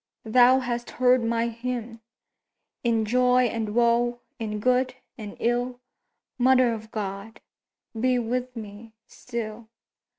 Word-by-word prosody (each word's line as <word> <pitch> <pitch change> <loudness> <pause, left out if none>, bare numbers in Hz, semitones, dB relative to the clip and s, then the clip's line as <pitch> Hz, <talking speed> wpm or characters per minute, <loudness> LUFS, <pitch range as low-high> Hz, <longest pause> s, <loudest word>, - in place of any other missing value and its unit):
thou 245 +3 +6
hast 240 -1 -3
heard 250 -1 +4
my 230 0 0
hymn! 235 -1 -5 0.8
In 230 -2 +1
joy 250 +2 +3
and 225 -3 -2
woe—in 235 -2 0
good 255 +2 +1 0.2
and 215 -5 -9
ill— 245 +1 -1 0.6
Mother 255 -1 +4
of 220 0 -8
God, 205 +1 -6 0.5
be 250 +2 +1
with 250 +2 -2
me 220 0 -9
still! 230 -2 -7
235 Hz, 110 wpm, -25 LUFS, 225-250 Hz, 0.8 s, thou